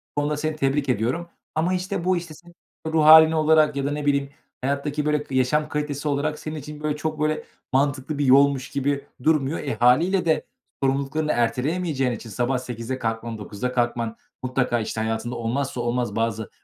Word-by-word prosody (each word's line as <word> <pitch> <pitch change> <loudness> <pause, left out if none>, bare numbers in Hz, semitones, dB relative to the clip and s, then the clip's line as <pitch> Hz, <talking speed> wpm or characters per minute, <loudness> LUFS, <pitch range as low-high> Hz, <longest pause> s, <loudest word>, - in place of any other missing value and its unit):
Bu 145 - +1
konuda 150 0 -1
seni 155 0 -2
tebrik 140 -1 0
ediyorum 125 +10 -1 0.3
ama, 170 +4 +1
işte, 185 0 -2
bu, 185 -1 +3
işte, 170 -2 -6
senin 175 +2 -17 0.3
ruh 160 -1 +2
hâlin 160 +1 +9
olarak 155 -1 +4
ya 140 -1 -1
da, 140 - 0
ne 145 0 -3
bileyim, 140 -1 +1 0.3
hayattaki, 140 +2 -1
böyle, 150 -1 +1
k 135 - -6
yaşam 150 +4 +2
kalitesi 150 -1 -3
olarak 150 +1 -1
senin 155 0 -6
için, 150 +1 -8
böyle, 150 -1 0
çok, 155 0 -3
böyle, 155 0 0 0.3
mantıklı 140 +1 0
bir 145 - +1
yolmuş 135 0 +4
gibi 140 0 -1 0.2
durmuyor. 155 -1 +2
E, 140 - -3
hâliyle 170 +11 +3
de 160 -1 +2 0.4
sorumluluklarını 140 +3 0
erteleyemeyeceğin 135 +3 0
için 115 0 -7
sabah 125 +5 0
08.00'de 125 +1 -5
kalkman, 115 0 -3
09.00'da 105 +4 -4
kalkman 120 -2 -1 0.3
mutlaka, 125 -2 0
işte, 110 0 -3
hayatında 110 +2 -2
olmazsa 120 +2 -2
olmaz 120 -2 -1
bazı 110 -1 -1
140 Hz, 180 wpm, -24 LUFS, 125-155 Hz, 0.4 s, hâlin